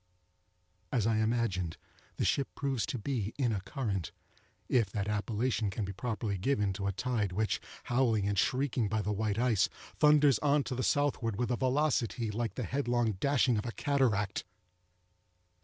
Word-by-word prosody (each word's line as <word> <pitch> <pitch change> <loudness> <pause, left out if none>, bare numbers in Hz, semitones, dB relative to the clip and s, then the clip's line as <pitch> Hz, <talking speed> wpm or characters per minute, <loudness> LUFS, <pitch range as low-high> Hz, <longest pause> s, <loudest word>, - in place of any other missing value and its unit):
As 115 -5 +1
I 115 -1 +2
imagined, 110 -7 0 0.4
the - - 0
ship 140 - +2
proves 135 -7 -1
to - - -2
be 115 -3 -3
in 130 -5 +1
a 100 -3 -1
current—if 105 - -3
that 100 +1 -3
appellation 105 +1 0
can 100 +2 -3
properly 110 -1 -2
be - - -10
given 105 -5 +1
to 100 +1 -3
a - - +1
tide 110 0 -1
which, 105 +3 0 0.2
howling 120 -5 +2
and 100 - 0
shrieking 125 +4 +1
by 110 0 0
the 105 +1 -1
white 105 0 -1
ice, 115 -7 +3 0.3
thunders 150 -4 +5
on 145 0 +3
to - - -4
the 130 - -2
southward 130 -6 +1
with 120 +4 -1
a - - +2
velocity 130 -4 0
like 110 -1 -2
the 125 - -3
headlong 120 0 0
dashing 130 -4 +3
of 105 - -5
a - - -2
cataract. 115 -9 0
115 Hz, 165 wpm, -31 LUFS, 105-130 Hz, 0.4 s, thunders